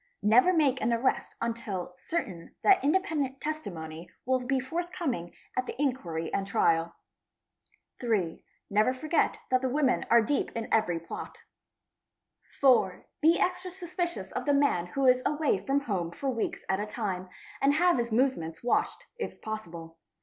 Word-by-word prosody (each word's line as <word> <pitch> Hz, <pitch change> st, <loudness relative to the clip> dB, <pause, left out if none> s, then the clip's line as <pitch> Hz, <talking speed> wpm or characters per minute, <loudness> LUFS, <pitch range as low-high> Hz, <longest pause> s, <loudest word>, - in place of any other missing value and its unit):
Never 245 Hz, -, +6 dB
make 290 Hz, -7 st, +2 dB
an 230 Hz, -, +1 dB
arrest 235 Hz, +3 st, 0 dB
unless 230 Hz, -6 st, -3 dB, 0.2 s
certain 190 Hz, -, -4 dB
that 390 Hz, -2 st, +5 dB
independent 295 Hz, -5 st, +1 dB
testimony 170 Hz, -, -5 dB, 0.2 s
will 260 Hz, +1 st, +2 dB
be 260 Hz, +2 st, 0 dB
forthcoming 315 Hz, -, -3 dB, 0.2 s
at 255 Hz, 0 st, -1 dB
the -, -, -6 dB
inquiry 175 Hz, -, -2 dB
and 195 Hz, 0 st, -1 dB
trial. 170 Hz, -5 st, +2 dB, 1.0 s
3. 205 Hz, -9 st, -1 dB, 0.2 s
Never 215 Hz, +5 st, +2 dB
forget 310 Hz, +5 st, +1 dB
that 255 Hz, 0 st, +4 dB
the 260 Hz, -, 0 dB
women 275 Hz, 0 st, +1 dB
are 235 Hz, -1 st, +6 dB
deep 280 Hz, +6 st, 0 dB
in 230 Hz, -1 st, -3 dB
every 195 Hz, -7 st, +2 dB
plot. 165 Hz, -, -8 dB, 1.2 s
4. 245 Hz, -9 st, +4 dB, 0.2 s
Be 325 Hz, +2 st, +5 dB
extra 365 Hz, 0 st, 0 dB
suspicious 350 Hz, -1 st, -4 dB
of -, -, -3 dB
the 285 Hz, -1 st, +3 dB
man 280 Hz, -12 st, +2 dB
who 270 Hz, +9 st, -1 dB
is 255 Hz, 0 st, +5 dB
away 295 Hz, -10 st, +1 dB
from 275 Hz, +5 st, +1 dB
home 190 Hz, -10 st, -2 dB
for 270 Hz, +10 st, -3 dB
weeks 230 Hz, -3 st, -3 dB
at 190 Hz, 0 st, +1 dB
a 210 Hz, -, -2 dB
time, 195 Hz, -4 st, -3 dB, 0.3 s
and 280 Hz, +1 st, +4 dB
have 350 Hz, -3 st, +4 dB
his 235 Hz, -1 st, -2 dB
movements 220 Hz, -10 st, 0 dB
watched, 245 Hz, -, 0 dB
if -, -, -5 dB
possible. 170 Hz, -7 st, -7 dB
250 Hz, 155 wpm, -29 LUFS, 190-285 Hz, 1.2 s, Never